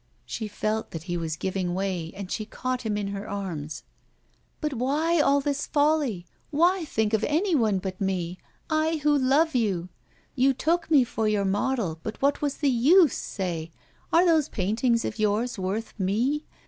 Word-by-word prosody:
She 220 - -4
felt 215 +1 -2
that 160 -1 -7
he 175 0 -3
was 165 -2 -2
giving 185 0 -2
way, 185 -4 -2
and 195 -2 -7
she 215 - -2
caught 255 +3 -3
him 215 -3 -2
in 205 -1 -2
her 200 +1 -5
arms: 160 -7 -5 0.8
'But 300 -2 -2
why 295 +7 +1
all 280 -1 +4
this 285 +1 -2
folly? 290 - +1 0.2
why 345 +4 +2
think 220 -6 -1
of 220 0 +2
anyone 295 - +2
but 185 0 -5
me 185 -2 -2 0.3
I 315 0 +1
who 295 0 +4
love 285 +4 +3
you? 195 -8 0 0.4
You 265 0 +3
took 335 +6 0
me 290 -5 +6
for 225 -2 -2
your 210 -2 +1
model, 200 -4 0
but 220 - -6
what 280 +1 +1
was 285 -2 -1
the 285 -3 +2
use, 295 +6 +5
say? 170 -4 -4 0.4
Are 340 +2 +5
those 320 -4 +3
paintings 230 +4 0
of - - -4
yours 215 +2 0
worth 195 +4 -3
me? 240 +11 0
225 Hz, 175 wpm, -26 LUFS, 195-290 Hz, 0.8 s, me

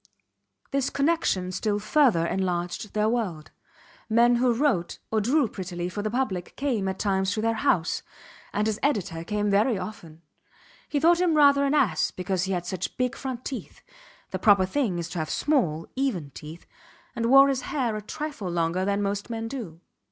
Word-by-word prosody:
This 275 -1 0
connection 280 - 0
still 205 +3 -1
further 215 - +3
enlarged 180 +2 -2
their 210 0 +2
world. 210 -10 -2 0.6
Men 235 +2 +4
who 245 0 +3
wrote 230 - 0
or 220 -1 +2
drew 265 +5 +2
prettily 180 -3 -5
for 195 +3 -4
the 215 - -2
public 215 -7 -2
came 245 -8 -1
at 190 0 -2
times 190 -2 0
to 215 - -2
their 230 0 +2
house, 185 -6 +1 0.5
and 210 - 0
his 215 -1 -1
editor 195 - -1
came 210 +2 -1
very 215 +3 +3
often. 175 -4 -8 0.7
He 290 - 0
thought 340 +3 +4
him 345 -3 +3
rather 280 -1 +6
an 280 +2 +1
ass 270 -8 +2
because 185 0 -2
he 190 - -3
had 175 -1 -2
such 185 -1 -4
big 250 -1 0
front 255 -2 -6
teeth 270 - -7 0.5
(the - - -3
proper 200 -4 +5
thing 205 -3 -1
is 170 -1 -3
to 180 - -4
have 155 -1 -3
small, 170 - +1
even 220 - -1
teeth) 155 +5 -10 0.5
and 230 0 0
wore 275 +2 +8
his 270 -2 0
hair 250 -7 -1
a 215 - -4
trifle 290 -3 -5
longer 170 +1 0
than 200 +1 0
most 200 +2 -2
men 225 -1 -3
do. 215 - -7
210 Hz, 180 wpm, -26 LUFS, 180-260 Hz, 0.7 s, wore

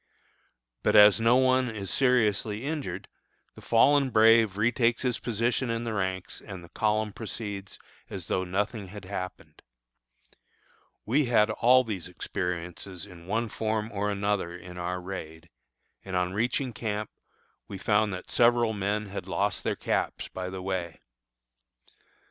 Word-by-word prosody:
But - - +2
as 105 +1 +8
no 115 +2 +5
one 130 -1 +3
is 100 -4 -5
seriously 115 -3 +2
injured, 140 - -4 0.5
the - - -13
"fallen 135 +4 +4
brave" 110 -3 +5
retakes 115 +2 +2
his 125 -2 0
position 120 +2 0
in 115 0 -1
the 115 -1 -3
ranks 95 -2 -3
and 95 -4 -8
the 85 - -13
column 110 +1 0
proceeds 105 -3 -6 0.3
as 95 -4 -6
though 95 - 0
nothing 100 +3 -2
had 100 0 -10
happened. 90 -1 -7 1.4
We 135 +7 +2
had 115 -3 +3
all 125 +4 +5
these 105 -8 -5
experiences 90 +1 -4
in 90 -3 -14
one 115 +4 0
form 110 0 -2
or 105 0 -1
another 100 -3 -1
in 90 0 -10
our 90 +1 -2
raid, 85 -3 -8 0.5
and 95 -1 -5
on 90 0 0
reaching 125 +4 0
camp 110 -1 -3 0.6
we 100 - -6
found 105 +2 +2
that 90 -1 -6
several 120 -1 +4
men 105 +1 -2
had 100 - -6
lost - - 0
their - - 0
caps - - -2
by 95 0 -5
the 95 0 -6
way. 90 -3 -3
105 Hz, 145 wpm, -28 LUFS, 95-115 Hz, 1.4 s, as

